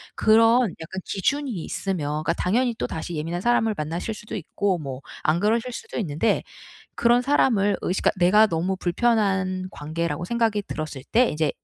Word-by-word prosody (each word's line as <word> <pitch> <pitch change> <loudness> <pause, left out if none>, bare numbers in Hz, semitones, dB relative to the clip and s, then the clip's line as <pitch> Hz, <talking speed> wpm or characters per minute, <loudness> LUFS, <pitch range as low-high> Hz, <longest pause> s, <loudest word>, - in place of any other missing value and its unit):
그런 225 +2 +5
약간 190 +4 -6
기준이 280 +8 -1
있으면 180 -4 -3
그러니까 165 - +1
당연히 235 +8 +1
또다시 165 -4 -4
예민한 165 +3 -3
사람을 225 -1 +2
만나실 165 +8 -3
수도 210 - -8
있고 190 +2 -1
뭐 135 -3 -6 0.2
안 155 +2 +2
그러실 225 +5 +1
수도 - - -6
있는데 180 +2 0 0.5
그런 240 +1 +4
사람을 225 -7 +2
의식 185 - -1
그러니까 180 -3 +3
내가 210 +4 +6
너무 175 +3 -1
불편한 185 -1 0
관계라고 160 +1 -3
생각이 225 -1 +1
들었을 155 -7 -6
때 240 +1 +5
이제 155 -1 0
190 Hz, 380 characters per minute, -24 LUFS, 165-225 Hz, 0.5 s, 내가